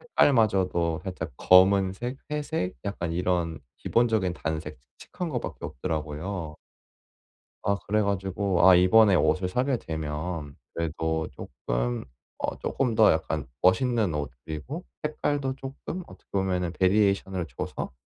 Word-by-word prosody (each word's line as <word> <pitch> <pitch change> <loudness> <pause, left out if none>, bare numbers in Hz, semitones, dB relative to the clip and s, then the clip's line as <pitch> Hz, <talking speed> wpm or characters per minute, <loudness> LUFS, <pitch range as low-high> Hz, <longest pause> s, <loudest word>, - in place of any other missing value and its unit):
색깔마저도 95 - +2
살짝 90 -4 -4
검은색, 95 +6 +4
회색, 150 - -2
약간 85 -4 -3
이런 85 -1 0 0.2
기본적인 110 -6 +2
단색, 80 -5 -4 0.2
칙칙한 180 -2 -5
것 125 - -1
밖에 - - -7
없더라고요. 80 +3 -4 1.1
아 100 - +2
그래 105 +1 +2
가지고 95 -2 +1
아 95 - +9
이번에 100 +3 +6
옷을 90 +1 +2
사게 130 +6 +1
되면 80 -2 -4 0.2
그래도 80 0 -1
쪼끔 - - -3 0.3
어 - - -3
쪼끔 125 -5 -1
더 - - +7
약간 - - -2
멋있는 105 -1 +3
옷 70 -2 -3
그리고 130 - -6 0.2
색깔도 145 -3 -1
쪼끔 135 +7 -6
어떻게 90 - -16
보면은 90 -3 0
베리에이션을 95 -2 +2
줘서 - - -4
95 Hz, 285 characters per minute, -27 LUFS, 80-110 Hz, 1.1 s, 아